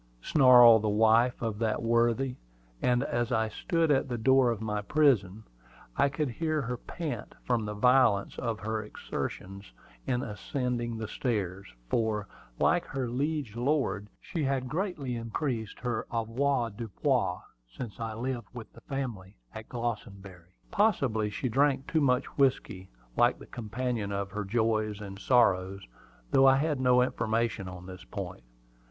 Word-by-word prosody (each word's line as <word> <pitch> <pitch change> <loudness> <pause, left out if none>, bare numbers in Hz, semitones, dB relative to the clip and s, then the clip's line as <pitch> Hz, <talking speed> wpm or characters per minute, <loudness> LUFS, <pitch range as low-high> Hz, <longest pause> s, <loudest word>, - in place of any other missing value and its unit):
snarled 120 -5 +7
the 105 - 0
wife 115 +4 +3
of 110 -2 -2
that 110 -2 0
worthy; 120 +3 +2 0.5
and 125 +1 +2
as 120 -2 -1
I 110 -2 +1
stood 165 - 0
at 135 -1 +2
the 120 - -2
door 130 +2 +4
of 115 -3 -1
my 105 -1 -2
prison, 110 -6 +2 0.5
I 140 - +3
could 140 -1 -2
hear 155 +4 -1
her 125 0 -3
pant 145 -4 -6
from 120 -3 0
the 105 0 -4
violence 125 -3 +3
of 115 -3 -2
her 110 +1 -2
exertions 100 -2 -6 0.4
in 125 0 0
ascending 120 +1 -3
the 110 -1 -4
stairs, 100 -6 -2 0.2
for, 105 - 0 0.3
like 175 0 +3
her 135 -3 -3
liege 135 -1 -2
lord, 125 -5 0
she 170 -4 -4
had 135 -2 0
greatly 150 -5 -3
increased 115 -1 -3
her 120 -3 -2
avoirdupois 115 -2 0 0.3
since 110 - -8
I 115 -1 -4
lived 120 -1 -4
with 115 -2 -9
the 115 - -15
family 115 - -5 0.2
at 110 0 -9
Glossenbury. 100 -7 -6 0.2
Possibly 140 - +2
she 105 +5 -3
drank 135 +2 +2
too 160 - 0
much 125 -1 +2
whiskey, 115 -8 +1 0.3
like - - +3
the - - -12
companion 120 -2 -3
of 100 0 -3
her 105 +1 -4
joys 110 -1 0
and 100 -2 -8
sorrows, 95 -6 +2 0.5
though 135 0 +6
I 135 - +7
had 145 0 0
no 125 -1 +4
information 115 -4 -1
on 90 -1 -9
this 90 -1 -10
point. - - -7
120 Hz, 150 wpm, -29 LUFS, 105-130 Hz, 0.5 s, snarled